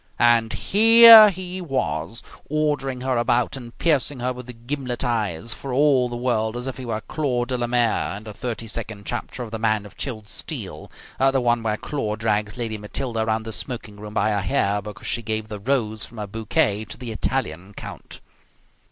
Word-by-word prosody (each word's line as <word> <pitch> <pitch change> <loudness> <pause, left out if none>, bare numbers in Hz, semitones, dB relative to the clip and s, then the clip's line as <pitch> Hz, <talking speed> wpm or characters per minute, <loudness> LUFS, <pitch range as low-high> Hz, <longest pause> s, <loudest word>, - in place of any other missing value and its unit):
And 120 -2 +4
here 225 +1 +9
he 185 -1 -5
was, 90 - -2 0.3
ordering 145 -4 -1
her 130 -1 0
about 120 +1 +1
and 120 -3 -10
piercing 145 -4 +1
her 125 +1 -1
with 125 -2 -11
gimlet 130 -2 -3
eyes, 115 -4 -1
for 135 - -7
all 130 -2 +3
the 120 - -5
world 120 -2 0
as 125 - -5
if 130 -1 -5
he 130 - -7
were 110 -1 -2
Claude 125 -3 -2
Delamere, 120 -4 0
in 105 - -10
the 110 -1 -8
thirty 115 +1 -5
second 110 -2 -6
chapter 120 +1 -4
of 115 - -9
"The 110 - -4
Man 110 -2 +1
of 100 -1 -13
Chilled 110 -6 -5
Steel", 100 - -6 0.3
the 135 0 +3
one 120 -1 +2
where 110 -1 -1
Claude 110 -7 -3
drags 105 -1 0
Lady 110 -3 -3
Matilda 115 +3 -4
around 110 0 0
the 110 0 -6
smoking 105 +1 -5
room 105 0 -9
by 110 +2 +2
her 100 -1 0
hair 105 -3 +1
because 105 0 -9
she 120 - -1
gave 110 -1 -2
the 105 -1 -6
rose 110 -3 0
from 110 +4 -8
her 105 - -3
bouquet 105 0 0
to - - -7
the 125 -3 -6
Italian 105 -5 -3
count. - - -9
120 Hz, 190 wpm, -23 LUFS, 110-130 Hz, 0.3 s, here